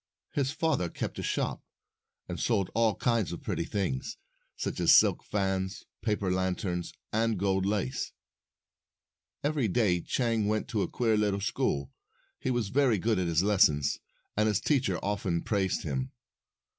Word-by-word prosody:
His 140 -2 +1
father 145 - 0
kept - - -4
a - - -2
shop, - - -1 0.7
and - - -5
sold 100 -6 +1
all 115 -3 +3
kinds 115 -5 +1
of 85 - -7
pretty 85 - -2
things, 90 -11 -2 0.4
such - - -3
as - - +7
silk - - +3
fans, 95 -1 -2 0.2
paper 105 -4 0
lanterns, 90 -1 -1 0.2
and 110 0 +1
gold 95 0 +1
lace. 105 +6 -1 1.3
Every 145 -5 +1
day 95 -4 +2
Chang 115 -2 0
went 110 0 0
to 110 -6 0
a - - 0
queer 115 -3 +1
little 105 -2 +1
school. 70 -8 -1 0.5
He - - -2
was 120 -5 0
very 130 -2 +3
good 110 +1 +1
at 90 - 0
his 85 +1 +2
lessons, 75 -9 +3 0.4
and 105 +1 +3
his 105 -3 +2
teacher 130 - +1
often 100 -4 -1
praised 95 -3 0
him. 65 -4 -2
100 Hz, 155 wpm, -29 LUFS, 90-115 Hz, 1.3 s, as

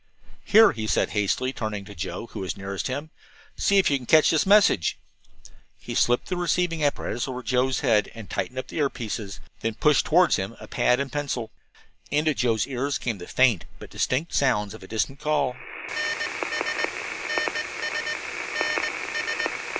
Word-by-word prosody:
"Here," 220 0 +7
he 110 -1 -4
said - - +1
hastily, 110 +5 0
turning 105 -5 -4
to 100 - -10
Joe, 95 +4 -5
who - - -9
was 95 - -4
nearest 100 0 -4
him, 145 +4 -4 0.4
"see 200 - +2
if 195 - +4
you 140 - +3
can 125 -2 -11
catch 155 -1 +6
this 160 +3 +2
message." 200 - +4 0.8
He - - -7
slipped 120 0 +2
the 180 - -2
receiving 175 -2 0
apparatus 140 -3 -1
over 130 -1 -5
Joe's 130 +1 +1
head, 105 -3 +3
and 115 -3 -9
tightened 130 - -3
up 130 - -2
the - - -7
ear 145 -2 +3
pieces, 105 -5 -5 0.2
then 115 -1 -2
pushed 150 +4 +3
toward 175 +2 +5
him 95 +4 -1
a - - -10
pad 125 +1 +2
and 140 -2 -2
pencil. 130 -6 -3 0.6
Into 155 +1 +2
Joe's 115 -5 +1
ears 140 +1 -2
came 115 -5 -3
the 90 - -9
faint 125 -8 +3
but - - -12
distinct 150 +7 -1
sounds 105 -7 +1
of 110 - -11
a 95 - -11
distant 115 +6 -2
call 150 -5 0
125 Hz, 160 wpm, -25 LUFS, 110-150 Hz, 0.8 s, Here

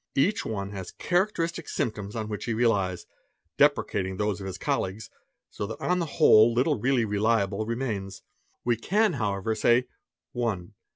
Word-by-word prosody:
each 195 +10 +2
one 100 -2 -4
has 95 -3 -7
"characteristic 175 -3 -1
symptoms 105 -2 -3
on 110 -2 -3
which 105 -1 -5
he 115 - -1
relies, 100 -6 +1 0.5
depreciating 100 -10 +2
those 105 -2 -1
of 95 - -5
his 95 - -5
olleagues; 95 +4 -2 0.4
so 100 - -4
that 110 - -7
on 180 0 +1
the 170 - -1
whole 115 -7 +7
little 125 +3 +1
really 125 0 +2
reliable 105 0 0
remains. 115 -5 -3 0.4
_We 120 -2 +1
can 210 - +2
Owever, 105 -3 -1
say 120 +3 +3 0.2
:— - - -65
1. 110 -8 -3
110 Hz, 160 wpm, -27 LUFS, 100-130 Hz, 0.5 s, whole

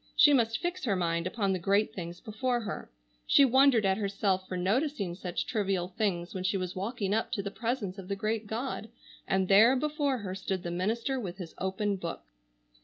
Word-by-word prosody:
She 295 -2 +7
must 225 -4 +3
fix 355 +1 -3
her 205 -5 +2
mind 170 -1 0
upon 195 0 0
the 185 - -1
great 200 +4 +2
things 175 -1 -6
before 245 +3 -1
her. 215 - -5 0.4
She 280 - +7
wondered 260 -3 +5
at 190 +1 +2
herself 195 -2 0
for 185 - -4
noticing 200 - 0
such 180 0 -3
trivial 195 -6 -1
things 185 -4 -2
when 185 - -4
she 190 +1 +1
was 185 -1 -4
walking 200 +1 -2
up 220 - 0
to 200 -5 -1
the 200 - -4
presence 220 -4 -3
of 185 - -9
the 200 - -2
great 215 +2 -2
God, 225 0 -4 0.4
and 190 -1 +1
there 220 +7 +7
before 290 -1 0
her 200 -5 -5
stood 190 -1 -3
the 175 - -3
minister 225 +9 -1
with 185 -6 -5
his 180 -4 -8
open 195 +2 -1
book! 170 -2 -5
200 Hz, 200 wpm, -30 LUFS, 185-235 Hz, 0.4 s, She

